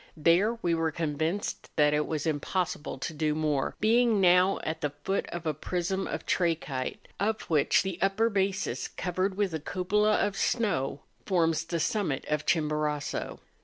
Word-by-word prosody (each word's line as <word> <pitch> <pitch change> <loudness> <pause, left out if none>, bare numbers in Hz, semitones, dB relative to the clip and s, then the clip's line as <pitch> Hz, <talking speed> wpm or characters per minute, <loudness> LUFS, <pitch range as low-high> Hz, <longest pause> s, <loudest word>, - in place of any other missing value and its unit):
There, 180 +9 +3
we 170 - +2
were 165 -1 +1
convinced 160 +4 -2
that 150 -1 +4
it 150 0 +1
was 155 -1 -2
impossible 155 -1 -2
to 145 +5 -4
do 150 0 0
more, 150 -3 0
being 230 0 +4
now 180 +1 +5
at 160 +1 -3
the 145 - 0
foot 145 +7 -3
of 170 -1 -6
a 155 - +1
prism 180 +5 -2
of - - -4
trachyte, 160 -7 -1
of 215 +2 0
which 155 0 +3
the 190 -2 -4
upper 195 +4 +2
basis, 195 -3 -1
covered 185 +2 -2
with 200 -4 0
a 160 - -2
cupola 205 +6 +1
of 205 -1 +1
snow, 145 - 0 0.3
forms 165 -4 +2
the 170 0 -2
summit 160 -5 -1
of 150 -1 -1
Chimborazo. 150 -2 -1
170 Hz, 165 wpm, -28 LUFS, 150-195 Hz, 0.3 s, now